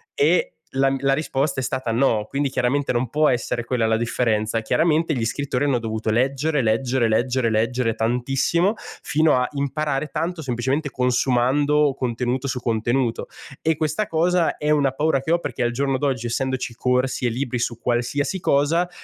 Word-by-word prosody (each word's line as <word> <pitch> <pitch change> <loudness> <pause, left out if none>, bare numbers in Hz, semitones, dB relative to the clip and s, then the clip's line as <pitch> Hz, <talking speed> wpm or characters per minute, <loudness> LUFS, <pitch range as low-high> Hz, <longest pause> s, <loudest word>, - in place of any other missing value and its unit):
E 475 +2 +3 0.3
la 135 0 +3
mi 135 - -1
la 135 0 +3
risposta 135 -2 -1
è - - -4
stata 125 -1 -2
no, 115 -3 +2
quindi 140 +2 -1
chiaramente 135 +2 0
non 120 0 -1
può 150 +4 +3
essere 120 -1 -1
quella 120 -1 0
la 110 0 +2
differenza. 115 -1 0
Chiaramente 160 +5 +1
gli 120 -5 -2
scrittori 130 +3 -1
hanno 140 -4 +2
dovuto 110 -1 -3
leggere, 135 +5 +1
leggere, 120 +2 +1
leggere, 120 +2 +1
leggere 115 +2 0
tantissimo 135 - +1 0.3
fino 155 -2 +2
a 125 - +1
imparare 140 +1 -1
tanto 165 +2 -3
semplicemente 135 +3 -1
consumando 135 +3 +2
contenuto 125 +2 -2
su 130 -1 -2
contenuto 120 +1 -1 0.3
e 160 -1 +1
questa 155 +7 -1
cosa 170 +1 +1
è 150 - -2
una 145 -3 +3
paura 145 0 +1
che 155 - -3
ho, 170 - +3
perché 150 - -3
al 120 - +1
giorno 135 +2 0
d'oggi, 130 -4 -1
essendoci 130 0 -2
corsi 125 +1 0
e - - +3
libri 125 +1 -2
su 115 -1 -2
qualsiasi 125 +10 -1
cosa, 160 +6 +2
130 Hz, 170 wpm, -22 LUFS, 120-145 Hz, 0.3 s, E